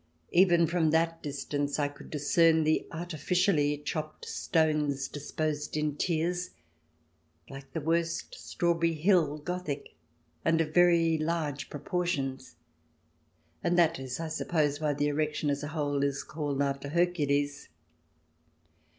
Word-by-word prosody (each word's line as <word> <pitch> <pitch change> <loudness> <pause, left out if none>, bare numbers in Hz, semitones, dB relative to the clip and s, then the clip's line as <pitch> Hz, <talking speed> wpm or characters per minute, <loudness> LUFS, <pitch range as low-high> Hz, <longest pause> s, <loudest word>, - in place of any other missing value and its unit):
Even 175 -2 +5
from 165 -1 +1
that 165 +1 +1
distance 145 0 -2
I 145 -1 +1
could 145 - -12
discern 160 +2 +3
the 155 +1 +1
artificially 170 -2 +1
chopped 155 +1 -5
stones, 150 -4 0
disposed 150 +1 -3
in 150 -1 0
tiers, 175 +3 -1 1.0
like 135 0 -10
the 160 - -2
worst 165 - -1
Strawberry 170 - 0
Hill 160 -3 +3
Gothic, 155 -2 -5 0.5
and 165 0 +3
of 155 -1 -1
very 170 -2 +4
large 155 -3 -2
propor 175 +5 -2
tions; 135 - -3 1.1
and 175 - +2
that 165 -3 +4
is, 130 0 -5
I 165 -1 -3
suppose, 155 -2 0
why 150 -2 +1
the 145 - 0
erection, 150 0 0
as 140 0 -2
a 150 - -4
whole, 145 -3 -1
is 140 0 -1
called 145 -3 -2
after 140 0 -2
Hercules. 145 -4 0
155 Hz, 130 wpm, -29 LUFS, 145-170 Hz, 1.1 s, Even